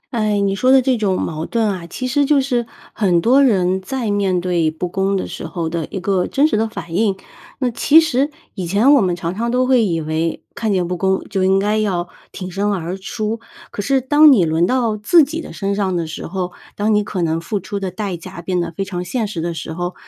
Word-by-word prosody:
哎， 215 -4 0
你 195 -1 +1
说 255 +6 +2
的 265 -1 +6
这 255 -1 +2
种 195 -4 0
矛 160 0 -3
盾 230 -2 0
啊， 185 -4 -4
其 255 +9 -5
实 285 +3 +2
就 290 -1 +4
是 245 -3 -1 0.3
很 180 -6 +2
多 260 +8 +4
人 190 -6 +2
在 235 +2 -3
面 195 -3 +1
对 175 -3 +1
不 165 +3 -4
公 195 +2 0
的 190 - -2
时 - - -7
候 170 -3 -3
的 165 -2 -3
一 190 - -4
个 185 0 0
真 285 +2 +2
实 215 - 0
的 225 +1 0
反 175 -6 -8
应。 200 0 +1 0.5
那 250 - +2
其 295 +7 +5
实 285 -2 0 0.2
以 190 - -4
前 210 +11 +4
我 280 - +5
们 180 -2 +1
常 175 +1 -4
常 235 +3 -2
都 250 +1 +2
会 255 -3 +4
以 170 -4 0
为 160 +1 -2
看 220 -2 -1
见 180 -3 0
不 180 - -2
公 190 +1 +1
就 190 -2 0
应 190 +1 +4
该 210 +2 +1
要 180 -5 -1 0.2
挺 185 -1 -6
身 200 +3 -1
而 180 -1 -3
出， 215 +3 -4 0.3
可 205 - -5
是 270 +5 +2
当 290 +3 +6
你 195 -9 +4
轮 160 +2 +2
到 235 -2 +1
自 265 +11 +5
己 325 +4 -5
的 - - -9
身 200 0 -2
上 195 -2 -1
的 165 -1 -1
时 155 - -7
候， 180 0 -4 0.2
当 210 +1 +1
你 210 0 +2
可 185 -3 -3
能 165 0 0
付 200 +3 -3
出 200 +3 -5
的 190 -2 -3
代 190 0 -4
价 170 0 -9
变 180 0 -1
得 170 - -3
非 195 +4 -3
常 180 -2 -5
现 220 +4 -2
实 180 -5 -4
的 170 0 -2
时 160 0 -6
候， 175 +2 -4
195 Hz, 265 characters per minute, -19 LUFS, 175-230 Hz, 0.5 s, 的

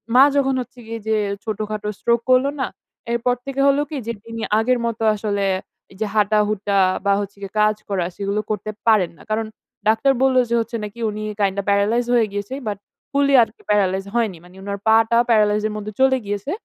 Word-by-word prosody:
মা 260 - +9
যখন 270 -1 +2
হচ্ছে 245 +1 -11
গিয়ে 230 0 -5
যে 220 - +2 0.3
ছোটখাটো 215 -1 -4
স্ট্রোক 235 0 +2
করলো 255 +2 +4
না, 260 - 0 0.4
এরপর 235 +1 +1
থেকে 275 0 -2
হলো 280 +1 +4
কি, 305 - -4
যে 235 - -1
তিনি 230 0 -6 0.2
আগের 250 +2 +2
মতো 230 -1 -2
আসলে 205 -1 -1 0.5
যে 220 - 0
হাঁটাহুটা, 210 -1 +1 0.3
বা 200 - +4
হচ্ছে 200 0 -7
গিয়ে 195 -1 -7
কাজ 215 0 +3
করা, 185 -4 0
সেগুলো 200 +1 -2
করতে 215 0 -3 0.2
পারেন 210 -6 +4
না। - - -15
কারণ 220 +1 0 0.4
ডাক্তার 225 +5 +4
বলল, 265 -1 +3
যে 235 - +2
হচ্ছে 230 +1 -3
নাকি 210 +3 -8
উনি 215 0 -5 0.2
কাইন্ডা 200 0 +1
প্যারালাইজ 210 +4 +2
হয়ে 235 -2 +4
গিয়েছে। 205 +6 -4
বাট 205 - -2 0.3
ফুললি 280 0 +2
আরকি 225 - -8
প্যারালাইজ 195 -2 +2
হয়নি। 220 -7 0
মানে 180 +1 -17
উনার 200 0 -5
পাটা 225 +1 +4
প্যারালাইজ 210 -2 +3
এর 215 - -5
মধ্যে 210 0 -5
চলে 265 0 +4
গিয়েছে। 205 +6 -3
215 Hz, 190 wpm, -21 LUFS, 205-235 Hz, 0.5 s, মা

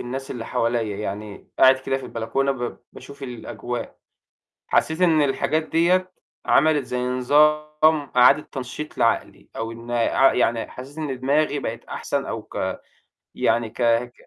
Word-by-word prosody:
الناس 135 +3 -5
اللي 120 -3 -5
حواليَّ، 115 -3 -1
يعني 105 0 -6
قاعد 130 0 +7
كده 135 0 -2
في 135 - -7
البلكونة 125 +4 -1
ب 120 -2 -5
باشوف 140 0 -12
الأجواء، 120 -1 -6 0.7
حسيت 160 +3 +1
إن 160 -4 +4
الحاجات 150 +3 +1
ديَّة 180 +4 +2 0.3
عَمَلِت 150 -4 +3
زي 125 0 -3
نظام 150 +3 +2
إعادة 135 +4 +6
تنشيط 135 +3 -6
لعقلي 115 - 0
أو 115 0 -3
إن 115 +1 -9
عق 120 +3 +3
يعني 115 -2 +1
حسيت 135 +4 -10
إن 140 -5 -4
دماغي 145 +2 +1
بقت - - -5
أحسَن - - -3
أو - - -4
ك - - -4 0.6
يعني 115 -1 +1
ك 120 - -6
ك 120 +1 +2
130 Hz, 145 wpm, -23 LUFS, 120-150 Hz, 0.7 s, قاعد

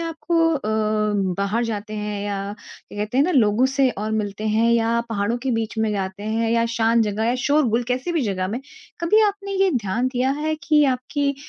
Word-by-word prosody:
आप 330 -1 -4
को 330 -1 +4
अ, 280 - -2 0.8
बाहर 205 +4 0
जाते 215 -1 -4
हैं 210 -1 -3
या 200 -1 -2 0.2
क्या - - -15
कहते 210 +4 -3
हैं 285 - +5
ना 365 - +1
लोगों 235 -3 +3
से 270 0 +2
और 215 -1 -4
मिलते 210 0 -2
हैं 225 +2 +2
या 230 0 +2
पहाड़ों 225 +1 -1
के 270 - -1
बीच 225 -1 -2
में 220 -1 +1
जाते 190 0 -4
हैं 225 +1 -1
या 230 0 +2
शांत 230 0 +3
जगह 210 +1 -2
या 240 - +1
शोर-गुल 260 -6 +2
कैसी 255 +7 -1
भी 325 - +1
जगह 190 -4 -1
में, 235 +5 -3 0.4
कभी 340 +6 +4
आपने 400 -1 -3
ये 385 - +3
ध्यान 235 0 0
दिया 255 +2 +1
है 310 +1 -1
कि 305 -3 +4
आपकी 280 +2 0
230 Hz, 210 wpm, -22 LUFS, 210-280 Hz, 0.8 s, हैं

